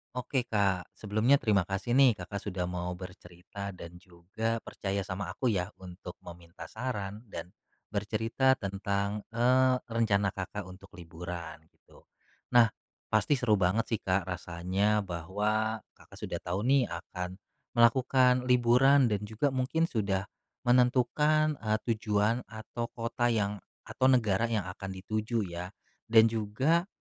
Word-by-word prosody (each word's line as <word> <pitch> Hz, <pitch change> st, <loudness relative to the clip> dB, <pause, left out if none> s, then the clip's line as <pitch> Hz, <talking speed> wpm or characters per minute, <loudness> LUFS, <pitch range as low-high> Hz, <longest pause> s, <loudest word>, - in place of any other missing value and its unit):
Oke 125 Hz, 0 st, -2 dB
Kak, 95 Hz, -5 st, +1 dB
sebelumnya 110 Hz, +6 st, +2 dB
terima 105 Hz, -9 st, +2 dB
kasih 95 Hz, +4 st, -3 dB
nih 130 Hz, -3 st, +6 dB
Kakak 100 Hz, +2 st, -6 dB
sudah 90 Hz, -2 st, -2 dB
mau 90 Hz, 0 st, -3 dB
bercerita 90 Hz, +1 st, -9 dB
dan 85 Hz, 0 st, -10 dB
juga 95 Hz, +6 st, -4 dB
percaya 100 Hz, 0 st, -3 dB
sama 95 Hz, 0 st, -4 dB
aku 125 Hz, -3 st, +1 dB
ya 90 Hz, -2 st, 0 dB, 0.2 s
untuk 90 Hz, 0 st, -9 dB
meminta 85 Hz, 0 st, -11 dB
saran 110 Hz, -2 st, -5 dB
dan 90 Hz, -2 st, -7 dB, 0.4 s
bercerita 110 Hz, +6 st, +1 dB
tentang, 100 Hz, 0 st, -2 dB, 0.2 s
eee, 130 Hz, +2 st, +4 dB
rencana 105 Hz, -4 st, +1 dB
Kakak 100 Hz, +2 st, -5 dB
untuk 95 Hz, +1 st, -13 dB
liburan 85 Hz, -1 st, -7 dB
gitu. -, -, -23 dB, 0.5 s
Nah, 115 Hz, -3 st, +7 dB, 0.4 s
pasti 145 Hz, -, +3 dB
seru 110 Hz, -6 st, +2 dB
banget 95 Hz, +5 st, +2 dB
sih 110 Hz, -, +1 dB
Kak 95 Hz, 0 st, 0 dB
rasanya 95 Hz, +4 st, 0 dB
bahwa 105 Hz, +5 st, -1 dB
Kakak -, -, -18 dB
sudah -, -, -3 dB
tahu 90 Hz, +4 st, -3 dB
nih 135 Hz, +2 st, +4 dB
akan 90 Hz, +2 st, -6 dB, 0.4 s
melakukan 125 Hz, +2 st, +5 dB
liburan 125 Hz, +1 st, +5 dB
dan 105 Hz, -1 st, 0 dB
juga 110 Hz, +6 st, 0 dB
mungkin 130 Hz, +5 st, 0 dB
sudah 100 Hz, -4 st, 0 dB, 0.4 s
menentukan, 130 Hz, +5 st, +3 dB
eee, 110 Hz, -1 st, 0 dB, 0.2 s
tujuan 110 Hz, +2 st, 0 dB
atau 110 Hz, +2 st, -6 dB
kota 115 Hz, +1 st, -1 dB
yang, 105 Hz, -3 st, 0 dB, 0.2 s
atau 130 Hz, -, 0 dB
negara 115 Hz, -4 st, +3 dB
yang 110 Hz, -4 st, 0 dB
akan 95 Hz, +1 st, -8 dB, 0.2 s
dituju 110 Hz, +2 st, -1 dB
ya. 85 Hz, +1 st, -5 dB, 0.4 s
Dan 110 Hz, 0 st, +6 dB
juga 130 Hz, -, +1 dB
105 Hz, 135 wpm, -30 LUFS, 95-120 Hz, 0.5 s, Nah